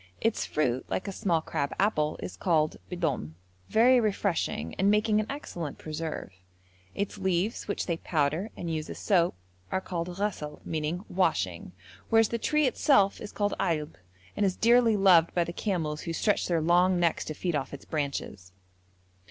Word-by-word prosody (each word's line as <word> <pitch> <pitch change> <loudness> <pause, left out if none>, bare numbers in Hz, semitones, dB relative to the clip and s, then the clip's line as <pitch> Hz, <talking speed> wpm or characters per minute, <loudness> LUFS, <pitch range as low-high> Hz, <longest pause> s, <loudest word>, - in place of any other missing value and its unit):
Its 225 -1 0
fruit, 130 -4 0
like 185 - -2
a - - -2
small 180 -5 0
crab 140 -2 -2
apple, 155 -7 +1
is 90 +1 -6
called 155 - +1
b'dom, 160 - -2 0.3
very 245 +3 +5
refreshing, 195 - -1
and 195 +2 +4
making 210 +1 +3
an 215 - -1
excellent 175 - -5
preserve; 155 -7 -5 0.6
its 200 0 -3
leaves, 190 +3 0
which 205 - -2
they 170 -2 -1
powder 160 +5 0
and 170 -2 -3
use 155 -1 -3
as - - -6
soap, 175 - +2 0.4
are - - +1
called 175 -2 -4
ghasl, 180 -8 -3
meaning 160 +4 -3
'washing'; 95 - 0 0.4
whereas 225 -1 +4
the 235 - -2
tree 300 +5 +2
itself 250 -6 +3
is 210 - -7
called 205 -1 -1
ailb, 155 -5 -1 0.4
and 210 - 0
is 190 -2 +2
dearly 235 -1 +4
loved 180 -4 +5
by 175 - +3
the 170 - -6
camels, 165 -7 -2
who 165 - -4
stretch 205 +5 +1
their 170 -2 +1
long 175 +2 +3
necks 170 -2 +1
to 155 - -6
feed 175 0 -2
off 135 -2 -2
its 140 - -9
branches. 140 - -4
175 Hz, 170 wpm, -28 LUFS, 155-205 Hz, 0.6 s, very